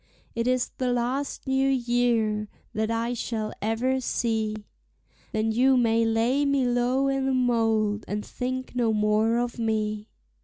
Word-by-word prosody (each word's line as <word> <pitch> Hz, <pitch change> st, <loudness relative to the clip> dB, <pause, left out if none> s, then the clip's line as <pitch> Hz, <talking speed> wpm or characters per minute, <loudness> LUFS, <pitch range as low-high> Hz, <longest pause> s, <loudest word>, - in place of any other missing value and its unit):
It 230 Hz, +1 st, -1 dB
is 255 Hz, -1 st, +1 dB
the 255 Hz, -1 st, +1 dB
last 245 Hz, +4 st, -2 dB
new 265 Hz, 0 st, +2 dB
year 240 Hz, -4 st, +1 dB, 0.2 s
that 220 Hz, +1 st, -1 dB
I 230 Hz, +1 st, -1 dB
shall 220 Hz, -2 st, -3 dB
ever 240 Hz, +5 st, 0 dB
see, 220 Hz, -3 st, -1 dB, 0.7 s
Then 220 Hz, +1 st, 0 dB
you 255 Hz, +3 st, +4 dB
may 230 Hz, -1 st, +3 dB
lay 230 Hz, +5 st, +2 dB
me 280 Hz, -2 st, +2 dB
low 245 Hz, +2 st, +1 dB
i' 270 Hz, 0 st, +1 dB
the 270 Hz, 0 st, 0 dB
mold, 225 Hz, -4 st, +1 dB
and 210 Hz, +1 st, -3 dB
think 255 Hz, 0 st, -4 dB
no 235 Hz, -3 st, +2 dB
more 215 Hz, +2 st, +2 dB
of 240 Hz, 0 st, -2 dB
me. 215 Hz, -1 st, -1 dB
235 Hz, 150 wpm, -26 LUFS, 220-255 Hz, 0.7 s, you